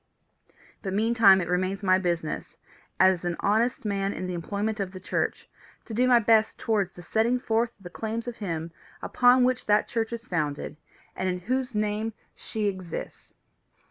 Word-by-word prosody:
But 190 -2 -4
meantime 215 -3 +5
it 170 - -3
remains 185 +3 -1
my 185 -1 +4
business, 170 -4 -3 0.4
as 185 -2 +4
an 175 -1 -1
honest 225 +4 +1
man 200 -1 -1
in - - -5
the 180 - -3
employment 205 +5 -2
of 195 -1 -3
the 185 - -7
church, 185 - -2 0.4
to 225 - -8
do 250 +3 +2
my 250 -1 +6
best 220 -1 +3
towards 205 -5 0
the 175 - -12
setting 225 +7 +1
forth 230 -1 0
of 195 - -22
the 175 - -9
claims 225 +3 -4
of 240 - -5
him 165 -5 -4 0.3
upon 250 +1 +4
whom 255 +1 +3
that 210 0 +3
church 225 -1 -2
is 235 0 -6
founded, 150 -6 -2 0.4
and 185 0 -1
in 180 0 -3
whose 255 +4 -2
name 215 +1 -1 0.2
she 215 -1 -4
exists. 185 -4 -5
205 Hz, 175 wpm, -27 LUFS, 185-225 Hz, 0.4 s, my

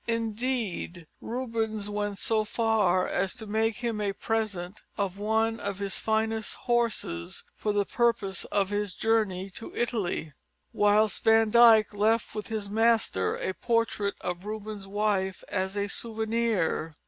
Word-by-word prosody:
Indeed, 225 -6 -2 0.2
Rubens 225 -3 -2
went 205 -1 -2
so 220 +1 +1
far 210 -5 +2
as 195 +4 -1
to 230 -3 -7
make 220 +1 0
him 230 -3 -2
a 200 -1 0
present 205 -4 -2 0.2
of 200 -1 -2
one 220 +2 +1
of 200 -1 -3
his 200 -1 -2
finest 220 0 0
horses 235 - -1
for 210 - -1
the 205 -1 +1
purpose 230 -4 +1
of 200 -1 0
his 205 -2 -1
journey 200 -4 0
in - - -8
Italy, 200 - -1 0.4
whilst 210 +1 +3
Van 225 -1 +5
Dyck 225 -2 +7
left 220 +2 +1
with 210 - -5
his 220 -3 -3
master 220 - +2
a 190 - -3
portrait 230 -3 0
of 180 0 -4
Rubens' 210 -1 -6
wife 195 -2 0
as 190 +1 -2
a 200 0 0
souvenir. 220 -8 -1
215 Hz, 140 wpm, -28 LUFS, 200-225 Hz, 0.4 s, Dyck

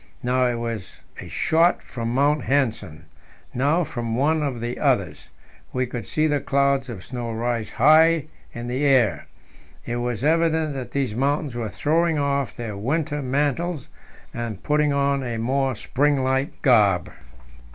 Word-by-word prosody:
Now 125 +1 +2
it 120 - -1
was 115 -4 -5 0.2
a - - -8
shot 165 +2 +2
from 115 -3 -4
Mount 145 +1 +1
Nansen, 110 - -1 0.5
now 145 +8 +2
from 120 -6 -4
one 155 +5 +2
of 135 -5 -2
the 120 +1 -4
others; 100 - 0 0.4
we 130 0 0
could 120 -4 -6
see 155 - 0
the 145 -2 +1
clouds 140 -1 +1
of 100 -6 -7
snow 120 -2 -5
rise 115 0 -2
high 155 +3 +5 0.3
into 120 +1 -5
the 135 +3 -1
air. 120 - +3 0.6
It 120 - -3
was 120 0 -3
evident 160 -1 +2
that 130 -2 -5
these 135 -6 -1
mountains 140 +3 0
were 115 -2 -3
throwing 160 +7 +1
off 140 -5 -1
their 115 -3 -5
winter 145 +7 -1
mantles 145 +4 -1 0.4
and 115 -4 -5
putting 150 0 +2
on 140 0 +1
a 120 -3 -3
more 130 +3 0
spring 140 +4 +1
like 130 +1 -1
garb. 105 - +4
130 Hz, 155 wpm, -23 LUFS, 120-145 Hz, 0.6 s, high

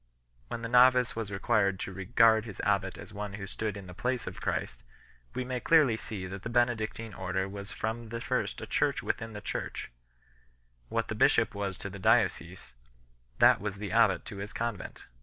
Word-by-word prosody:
When 115 - -5
the - - -1
novice 125 +1 +5
was 110 -3 -4
required 100 -1 +1
to 95 - -4
regard 110 +3 +4
his 105 -5 -9
abbat 100 -2 +1
as - - -11
one 105 0 -5
who 100 -1 -5
stood 105 +1 -3
in 100 - -8
the 90 - -10
place 125 +4 -2
of - - -7
Christ, - - -2 0.5
we 130 - -1
may 125 0 -2
clearly 150 -5 +5
see 105 -3 -6
that 95 +1 -6
the 115 - -5
Bene 120 0 +3
dictine 110 0 -5
Order 95 +1 -2
was 100 +1 -7
from 110 +1 -4
the 115 +1 -4
first - - -1
a - - -4
Church - - 0
within 110 0 -2
the 105 - -7
Church; - - -4 1.0
what - - -1
the - - -3
bishop - - +3
was 100 -3 -3
to 100 - -6
the 100 - -8
diocese, 95 - +1 0.6
that - - +6
was 105 -1 -3
the 100 0 -5
abbat 110 -6 +3
to 100 - -8
his 100 +2 -6
convent. 115 -4 -4
105 Hz, 195 wpm, -30 LUFS, 95-115 Hz, 1.0 s, that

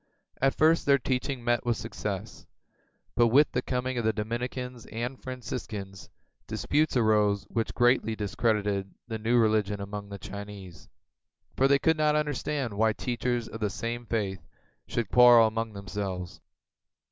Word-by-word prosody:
At 135 0 +3
first 160 0 +3
their 140 -1 +6
teaching 130 0 -2
met 120 -1 +1
with 120 -2 0
success, - - -5 0.7
but 120 -1 +4
with 140 +6 +5
the 125 - 0
coming 125 0 -2
of - - -2
the 110 - +3
Dominicans 120 +3 -4
and 120 +4 -5
Franciscans, 110 -6 -6 0.4
disputes 150 -2 +1
arose 105 -3 +3
which 115 -1 -2
greatly 120 -2 +3
discredited 105 -2 -1
the 110 -1 -4
new 115 +3 +2
religion 105 -3 +2
among 100 0 -6
the 100 - -6
Chinese, 100 -3 -9 0.7
for 135 - +4
they 140 0 +5
could 160 +3 +2
not 150 -1 +3
understand 145 -4 -1
why 110 +2 +2
teachers 120 0 -2
of 115 - -8
the 105 -2 0
same 115 +3 -4
faith 100 -5 -2 0.5
should 115 -5 -2
quarrel 120 -2 +8
among 110 0 -2
themselves. 95 -2 -5
115 Hz, 145 wpm, -28 LUFS, 105-125 Hz, 0.7 s, quarrel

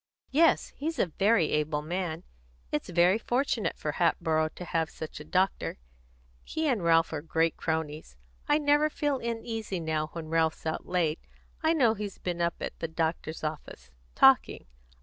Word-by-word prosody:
"Yes, 320 +4 +4
he's 320 +3 -3
a - - +3
very 195 0 +2
able 150 0 0
man. 170 0 -3 0.5
It's 150 - -2
very 180 +4 +4
fortunate 240 -6 0
for 150 - -2
Hatboro' 160 -1 +1
to 180 - -7
have 165 -2 0
such 160 - -8
a - - -8
doctor. 185 +5 0 0.7
He 315 0 -2
and 235 -10 +1
Ralph 165 -1 +3
are 150 - -2
great 165 +1 +1
cronies. 160 - -3 0.3
I 295 - +5
never 295 0 +3
feel 290 -3 -1
uneasy 225 -4 -3
now 155 -1 -1
when 165 -2 -6
Ralph's 160 -1 +1
out 160 - -3
late 170 -3 0 0.4
I 320 0 +3
know 250 -9 +4
he's 210 -2 -6
been 175 -1 -3
up 170 0 +1
at - - -5
the 165 - -2
doctor's 160 -1 -2
office, 150 - -6 0.2
talking. - - +5
170 Hz, 165 wpm, -29 LUFS, 160-225 Hz, 0.7 s, I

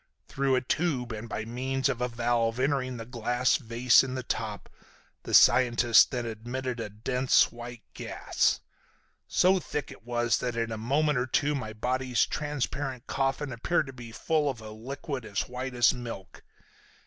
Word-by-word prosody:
Through 135 -1 +1
a 130 - +2
tube, 130 -3 -1
and 115 +1 -6
by 110 - -4
means 130 +3 -1
of 125 -3 -2
a 125 - +1
valve 115 0 0
entering 130 -2 0
the 115 - -7
glass 120 +1 +1
vase 120 0 +4
in 130 -1 -4
the 130 - -3
top, 110 -3 -4 0.5
the - - -7
scientist 120 -2 +6
then 125 -3 -3
admitted 120 +3 -4
a 110 - -4
dense 125 +5 +2
white 120 -1 -9
gas. - - 0 0.7
So 185 +1 +4
thick 150 -5 -5
was 120 -2 +1
it 120 -2 -3
that - - -1
in 115 0 -1
a - - -2
moment 140 +4 +1
or 125 - -1
two 145 +4 +1
my 125 -6 -4
body's 125 +2 0
transparent 140 -3 -3
coffin 135 +1 -1
appeared 150 +7 0
to 135 - -9
be 120 -2 -10
full 150 +4 0
of 130 -4 -4
a 110 -1 -9
liquid 135 +4 -6
as 100 -3 -2
white 125 +1 -5
as 120 0 +5
milk. 115 -9 -8
125 Hz, 170 wpm, -28 LUFS, 115-135 Hz, 0.7 s, scientist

